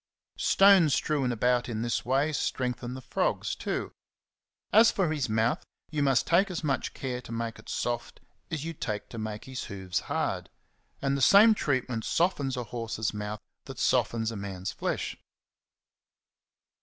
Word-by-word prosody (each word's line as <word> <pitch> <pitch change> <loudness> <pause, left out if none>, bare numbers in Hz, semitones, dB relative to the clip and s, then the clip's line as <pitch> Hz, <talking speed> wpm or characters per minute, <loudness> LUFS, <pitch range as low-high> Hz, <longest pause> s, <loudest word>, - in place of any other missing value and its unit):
Stones 195 -7 +6
strewn 140 -5 0
about 125 +1 +1
in 110 -1 -2
this 120 -1 -1
way 135 +5 +1
strengthen 125 -2 -2
the 130 - -8
frogs - - -1
too. - - -3 0.8
As 225 +2 +8
for 190 -7 0
his 145 -6 -1
mouth, 110 +2 +1 0.3
you 150 -2 -1
must 135 -3 +3
take 185 +5 +3
as 175 -2 -4
much 140 -3 -1
care 125 -2 -4
to 120 - -11
make 115 0 -3
it - - -13
soft 120 -1 -3 0.3
as 160 -2 -3
you 165 - -3
take 105 -8 -4
to 115 - -7
make 110 -1 -5
his 130 -1 -5
hoofs 95 -2 -3
hard; - - -2 0.5
and 135 0 +1
the 140 - -2
same 210 - +8
treatment 130 - -1
softens 145 - 0
a 125 - -2
horse's 110 -1 -3
mouth 105 0 -5 0.2
that - - -9
softens 115 -1 +1
a - - -6
man's 100 -2 -5
flesh. - - -3
125 Hz, 160 wpm, -28 LUFS, 115-150 Hz, 0.8 s, As